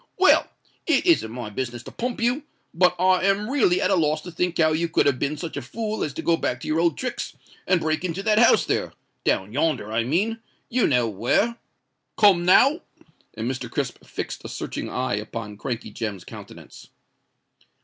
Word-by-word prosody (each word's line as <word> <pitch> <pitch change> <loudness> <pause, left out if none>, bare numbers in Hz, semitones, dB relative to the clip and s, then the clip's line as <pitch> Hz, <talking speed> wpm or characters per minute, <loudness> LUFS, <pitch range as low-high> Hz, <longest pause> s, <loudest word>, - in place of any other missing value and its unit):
"Well—it 355 -5 +2
isn't 340 - +3
my 120 -3 -6
business 120 +1 -4
to - - -10
pump 245 -1 -4
you; 245 +5 +1 0.3
but 180 +2 +3
I 185 0 +4
am 200 +4 +1
really 215 -11 +3
at - - +1
a - - +4
loss 155 -2 +1
to 175 - -9
think 175 +1 -1
how 155 -1 +4
you 165 +2 0
could - - +2
have 140 -3 +2
been 145 +2 -1
such 165 0 -6
a - - -2
fool 215 - -4
as 150 - -2
to - - -5
go 170 - +3
back 125 - -2
to - - -7
your 155 +1 +1
old 170 0 +2
tricks 255 -1 -4 0.3
and 185 - +3
break 155 +1 -1
into 185 +2 -3
that 215 0 +3
house 235 - +5
there—down 95 +3 -2
yonder, 135 -7 0
I 115 +1 +1
mean—you 225 - -1
know 125 -4 +2
where? 120 - +1 0.6
Come 190 -5 +5
now?" 275 - +5 0.5
And 110 +1 -3
Mr. 130 -2 -4
Crisp - - -3
fixed - - -6
a - - -7
searching - - -5
eye 125 -5 -1
upon 105 -1 -6
Crankey 115 -4 -4
Jem's 105 -5 -4
countenance. - - -12
165 Hz, 190 wpm, -24 LUFS, -, 0.6 s, house